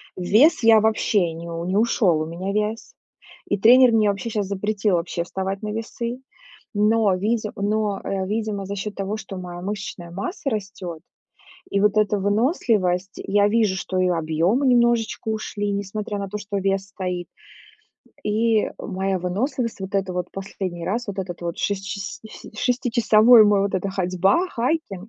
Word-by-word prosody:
Вес 220 Hz, -, +4 dB
я 225 Hz, -1 st, +7 dB
вообще 210 Hz, -5 st, +1 dB
ни 165 Hz, +1 st, -8 dB, 0.2 s
не 190 Hz, +2 st, 0 dB
ушёл, 205 Hz, -7 st, +2 dB
у -, -, -1 dB
меня 175 Hz, +4 st, -4 dB
вес. 215 Hz, -, -2 dB, 0.5 s
И 205 Hz, -, 0 dB
тренер 245 Hz, +5 st, +7 dB
мне 215 Hz, -2 st, +4 dB
вообще 200 Hz, +3 st, -3 dB
щас 210 Hz, -3 st, -2 dB
запретил 200 Hz, 0 st, 0 dB
вообще 170 Hz, 0 st, -2 dB
вставать 190 Hz, +2 st, -4 dB
на 210 Hz, -, -3 dB
весы. 235 Hz, +2 st, -4 dB, 0.6 s
Но 210 Hz, -1 st, +3 dB
видим 215 Hz, +3 st, -1 dB
но, 205 Hz, 0 st, -1 dB
э, 190 Hz, -1 st, -2 dB
видимо, 210 Hz, -1 st, -2 dB
за 200 Hz, +1 st, -4 dB
счёт 205 Hz, +1 st, -5 dB
того, 200 Hz, +2 st, -3 dB
что 195 Hz, -2 st, -8 dB
моя 175 Hz, -1 st, -7 dB
мышечная 195 Hz, -3 st, -5 dB
масса 240 Hz, -, -4 dB
растёт 195 Hz, -7 st, -5 dB, 0.7 s
и -, -, +1 dB
вот 210 Hz, +1 st, +3 dB
эта 210 Hz, -1 st, +2 dB
выносливость. 205 Hz, -, 0 dB
Я 205 Hz, 0 st, +3 dB
вижу, 210 Hz, -3 st, +2 dB
что 185 Hz, 0 st, -3 dB
и 185 Hz, 0 st, +3 dB
объемы 170 Hz, -, +1 dB
немножечко 235 Hz, -3 st, +2 dB
ушли, 215 Hz, -1 st, -2 dB
несмотря 205 Hz, +1 st, -4 dB
на 200 Hz, 0 st, -4 dB
то, 210 Hz, +2 st, -5 dB
что 205 Hz, 0 st, -5 dB
вес 195 Hz, 0 st, 0 dB
стоит, 180 Hz, -3 st, -4 dB, 1.0 s
и 220 Hz, +1 st, +1 dB
моя 190 Hz, 0 st, -2 dB
выносливость. 220 Hz, +6 st, -2 dB
Вот 190 Hz, +1 st, -6 dB
эта 195 Hz, -2 st, 0 dB
вот 180 Hz, 0 st, -2 dB
последний 190 Hz, -3 st, -5 dB
раз, 235 Hz, +5 st, -2 dB
вот 200 Hz, -, -5 dB
этот 180 Hz, -2 st, -5 dB
вот 170 Hz, -1 st, -4 dB
шес 200 Hz, -1 st, -1 dB
шиси 200 Hz, +2 st, -7 dB
шестичасовой 235 Hz, -2 st, +5 dB
мой 205 Hz, -1 st, +4 dB
вот 200 Hz, -1 st, -1 dB
эта 190 Hz, +1 st, -1 dB
ходьба, 190 Hz, -, +1 dB
хайкинг, 240 Hz, -, -2 dB
200 Hz, 165 wpm, -23 LUFS, 190-220 Hz, 1.0 s, я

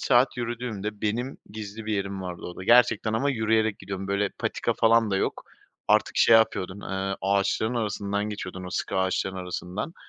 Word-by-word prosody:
saat 125 Hz, 0 st, +3 dB
yürüdüğümde, 115 Hz, -4 st, -4 dB
benim 120 Hz, +5 st, -2 dB
gizli 105 Hz, +1 st, -7 dB
bir 110 Hz, -, -1 dB
yerim 100 Hz, -1 st, -3 dB
vardı 90 Hz, -2 st, -6 dB
orada, 90 Hz, +1 st, -7 dB
gerçekten 120 Hz, -2 st, +4 dB
ama 140 Hz, +6 st, +1 dB
yürüyerek 110 Hz, -2 st, +1 dB
gidiyordum. 95 Hz, 0 st, -6 dB
Böyle 100 Hz, 0 st, +1 dB
patika -, -, -2 dB
falan 115 Hz, -1 st, +4 dB
da 95 Hz, -, +1 dB
yok. -, -, -2 dB, 0.4 s
Artık -, -, +3 dB
şey 115 Hz, -, +7 dB
yapıyordum, 100 Hz, -3 st, +1 dB
eee, 95 Hz, 0 st, -2 dB
ağaçların 100 Hz, +4 st, +1 dB
arasından 100 Hz, -2 st, -1 dB
geçiyordum, 95 Hz, -3 st, -6 dB
o -, -, -7 dB
sıkı -, -, -2 dB
ağaçların 95 Hz, 0 st, 0 dB
arasından. 90 Hz, -, -5 dB
105 Hz, 165 wpm, -26 LUFS, 95-115 Hz, 0.4 s, şey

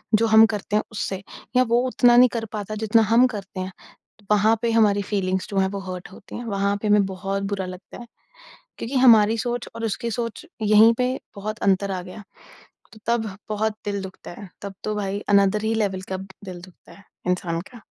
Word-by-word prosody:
जो 225 Hz, +2 st, +3 dB
हम 220 Hz, 0 st, +7 dB
करते 210 Hz, -2 st, -3 dB
हैं 215 Hz, -, +2 dB
उससे, 195 Hz, -2 st, -4 dB, 0.3 s
या 255 Hz, -, +6 dB
वो 235 Hz, -1 st, +2 dB
उतना 245 Hz, -1 st, +4 dB
नहीं 250 Hz, 0 st, +7 dB
कर 230 Hz, -1 st, -2 dB
पाता 215 Hz, 0 st, -4 dB
जितना 220 Hz, +1 st, +3 dB
हम 240 Hz, +2 st, +6 dB
करते 200 Hz, -5 st, -7 dB
हैं। 185 Hz, +1 st, -4 dB, 0.6 s
वहाँ 210 Hz, +2 st, +4 dB
पे 235 Hz, -1 st, +1 dB
हमारी 210 Hz, -3 st, +3 dB
फीलिंग्स 190 Hz, -2 st, -1 dB
जो 200 Hz, -, -4 dB
हैं 190 Hz, -, +3 dB
वो 200 Hz, 0 st, -5 dB
हर्ट 180 Hz, -1 st, -9 dB
होती 190 Hz, -, -12 dB
हैं, 240 Hz, -, -6 dB
वहाँ 200 Hz, -2 st, 0 dB
पे 215 Hz, -, -2 dB
हमें 205 Hz, -1 st, +4 dB
बहुत 195 Hz, +1 st, -3 dB
बुरा 195 Hz, -2 st, -2 dB
लगता 185 Hz, 0 st, -10 dB
है, 240 Hz, -, -10 dB, 0.7 s
क्योंकि 240 Hz, +5 st, -5 dB
हमारी 225 Hz, -4 st, +6 dB
सोच 240 Hz, +1 st, -3 dB
और 230 Hz, -, -4 dB
उसकी 225 Hz, +2 st, -2 dB
सोच 230 Hz, +5 st, -4 dB, 0.2 s
यहीं 215 Hz, +2 st, +6 dB
पे 250 Hz, 0 st, +1 dB, 0.2 s
बहुत 215 Hz, +2 st, -5 dB
अंतर 195 Hz, +1 st, +2 dB
आ 185 Hz, -1 st, -2 dB
गया, 185 Hz, +4 st, -10 dB, 0.7 s
तो 220 Hz, -, -14 dB
तब 230 Hz, -2 st, +1 dB, 0.2 s
बहुत 215 Hz, 0 st, -1 dB
दिल 200 Hz, -1 st, -2 dB
दुखता 190 Hz, 0 st, -9 dB
है। 200 Hz, -, -10 dB
तब 200 Hz, -1 st, -6 dB
तो 215 Hz, -, -2 dB
भाई 200 Hz, -1 st, -2 dB
अनअदर 200 Hz, +1 st, +3 dB
ही 220 Hz, +1 st, +1 dB
लेवल 200 Hz, -4 st, -1 dB
का -, -, -1 dB
दिल 190 Hz, -1 st, -10 dB
दुखता 185 Hz, 0 st, -16 dB
है 200 Hz, -, -17 dB, 0.3 s
इंसान 170 Hz, -2 st, -1 dB
का। 235 Hz, -4 st, -14 dB
210 Hz, 205 wpm, -23 LUFS, 195-225 Hz, 0.7 s, हम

